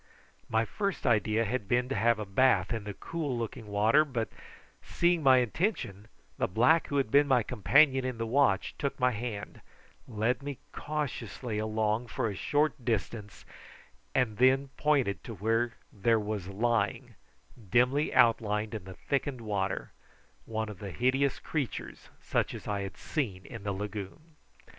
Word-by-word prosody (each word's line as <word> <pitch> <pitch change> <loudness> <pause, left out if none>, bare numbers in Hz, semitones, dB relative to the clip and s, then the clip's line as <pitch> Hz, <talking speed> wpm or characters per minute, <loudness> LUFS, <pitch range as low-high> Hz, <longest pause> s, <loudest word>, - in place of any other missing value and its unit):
My 110 +1 +2
first 200 - -3
idea 110 0 +2
had 110 -1 -2
been 125 +3 +2
to - - -1
have 115 0 +3
a 105 - -4
bathe 100 0 +3
in 110 -3 -4
the 105 -1 -5
cool 150 -7 -3
looking 115 0 -5
water, 105 +8 +4
but, 125 -7 -3 0.5
seeing 175 -1 +1
my 135 -3 +6
intention, 120 - -1 0.3
the - - +2
black 125 - +3
who 145 - -1
had 135 -6 0
been 145 +1 +5
my 130 -4 +4
companion 130 - +4
in 130 -2 -3
the 115 - -2
watch, 125 -4 +2
took 140 -1 -2
my 125 0 +3
hand, 110 -2 -5 0.5
led 115 +2 0
me 140 -1 -5
cautiously 125 -7 -4
along 110 +2 0
for 115 +1 -2
a - - -6
short 150 +5 0
distance, 110 -2 -3 0.7
and 115 -5 +1
then 130 +3 +4
pointed 140 -8 +1
to 115 - -7
where 115 +4 0 0.2
there 110 +2 +2
was 105 -3 -4
lying, 105 0 0 0.6
dimly 125 - +3
outlined 110 -2 +3
in 105 -4 -5
the 95 -1 -9
thickened 135 -2 -2
water, 100 -3 -2 0.5
one 110 -1 -3
of 105 -3 -9
the 100 - -6
hideous 130 +6 +1
creatures 145 -6 -4
such - - 0
as - - -9
I 100 -1 -1
had 95 -1 -6
seen 105 - -3
in 115 -4 -8
the 100 0 -2
lagoon. 105 - -6
115 Hz, 160 wpm, -30 LUFS, 105-135 Hz, 0.7 s, my